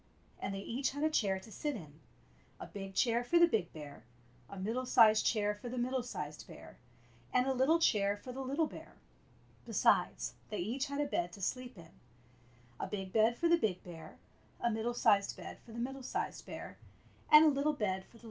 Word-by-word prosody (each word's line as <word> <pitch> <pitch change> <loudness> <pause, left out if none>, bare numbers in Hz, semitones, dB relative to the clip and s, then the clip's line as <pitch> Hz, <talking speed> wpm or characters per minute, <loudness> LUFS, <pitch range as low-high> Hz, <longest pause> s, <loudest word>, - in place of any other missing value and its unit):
And 195 0 -3
they 195 - -4
each 260 +6 -2
had 285 +1 -3
a 310 - +2
chair 195 -9 +1
to 205 +4 -14
sit 295 +7 -3
in 155 -7 -10 0.3
— - - -32
a - - -6
big 195 -1 -8
chair 235 0 +2
for 340 +8 +2
the 340 - +8
big 215 - 0
bear, 145 -7 -10 0.5
a 200 - -9
middle 230 +7 -2
sized 220 -4 +6
chair 210 -2 +1
for 210 +4 -8
the 250 - -5
middle 255 +1 0
sized 150 -11 -6
bear, - - -13 0.5
and 250 0 +3
a 265 - +1
little 265 +6 +4
chair 205 -10 +2
for 250 - -9
the 265 +2 -6
little 280 +5 0
bear. - - -10 0.7
Besides, - - +2 0.2
they 210 - -4
each 235 +10 -2
had 280 +1 -4
a - - +1
bed 175 -11 -1
to 200 - -10
sleep 250 +2 -3
in 165 -1 -13 0.5
— 120 0 -29
a - - -2
big 195 -2 -5
bed 225 +2 +4
for 340 - +2
the 340 0 +4
big 195 - -1
bear, 170 -3 -10 0.4
a 235 - +1
middle 225 +2 -2
sized 205 -4 +3
bed - - -9
for 230 - -16
the 225 - -9
middle 265 +3 -4
sized 255 - -4
bear, - - -8 0.5
and 300 +1 +10
a - - +7
little 285 +1 +1
bed - - -11
for 210 - +2
the 190 - +1
little 190 0 -4
bear. 230 - -16
225 Hz, 225 wpm, -34 LUFS, 195-260 Hz, 0.7 s, and